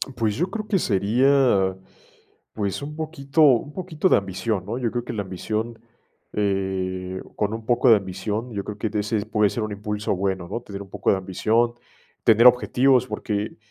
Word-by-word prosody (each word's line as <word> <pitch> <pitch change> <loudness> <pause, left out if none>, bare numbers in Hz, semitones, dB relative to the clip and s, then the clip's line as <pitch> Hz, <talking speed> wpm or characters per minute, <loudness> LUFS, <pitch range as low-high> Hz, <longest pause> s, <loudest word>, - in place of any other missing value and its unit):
Pues 110 -3 0
yo 175 +5 -1
creo 215 +1 -5
que 200 -3 +2
sería 110 - +3 0.8
pues, 100 +3 -2
un 150 +2 -6
poquito 155 -1 -2
un 140 +1 +4
poquito 180 -1 -1
de - - +6
ambición, 100 0 -2
¿no? 110 +4 -3
Yo 120 -3 -1
creo 120 0 -2
que - - -5
la 105 -3 -2
ambición 110 +5 -4 0.5
eh, 95 -2 -2
con 105 0 -1
un 110 0 -6
poco 120 +2 +3
de 110 - +8
ambición, 100 +5 -4
yo 100 -1 -3
creo 105 +1 -7
que 110 +1 -2
de 105 0 -2
ese 105 0 -1
puede 105 -1 +2
ser 115 - -3
un 110 - -4
impulso 105 0 -2
bueno, 95 -2 -2
¿no? 115 +5 -4
Tener 100 -4 -8
un 100 - -11
poco - - 0
de 95 - +2
ambición, 110 +5 +1 0.5
tener 115 +2 +7
objetivos. 125 +1 +4
Porque 105 -1 -3
110 Hz, 190 wpm, -23 LUFS, 100-125 Hz, 0.8 s, de